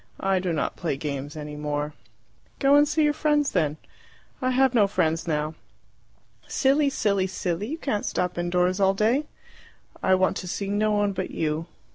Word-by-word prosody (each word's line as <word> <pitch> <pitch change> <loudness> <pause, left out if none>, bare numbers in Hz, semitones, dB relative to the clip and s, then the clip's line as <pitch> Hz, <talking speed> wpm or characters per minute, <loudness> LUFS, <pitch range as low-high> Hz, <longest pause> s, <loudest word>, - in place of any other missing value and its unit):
"I 195 -1 +1
do 180 -1 -2
not 160 - -1
play 160 -6 -2
games 145 0 -5
any 150 -1 -6
more." 150 0 -3 0.6
"Go 275 +1 +3
and 290 +1 +6
see 305 +1 +1
your 295 0 +3
friends 295 -2 +1
then." 155 -4 0 0.6
"I 255 - +1
have 260 0 +3
no 215 -4 +4
friends 165 -4 0
now." 155 -1 -1 0.9
"Silly, 280 +1 +2
silly, 200 -7 +1
silly! 180 +1 -3
You 310 +6 -4
can't 240 -10 -2
stop 180 0 -1
indoors 180 +2 +1
all 195 0 +3
day!" 240 +9 +1 0.7
"I 190 - +4
want 185 0 +1
to 185 - -6
see 195 +3 -3
no 210 +1 +1
one 205 -1 +2
but 190 -1 -3
you." 155 +1 -2
190 Hz, 175 wpm, -25 LUFS, 160-255 Hz, 0.9 s, and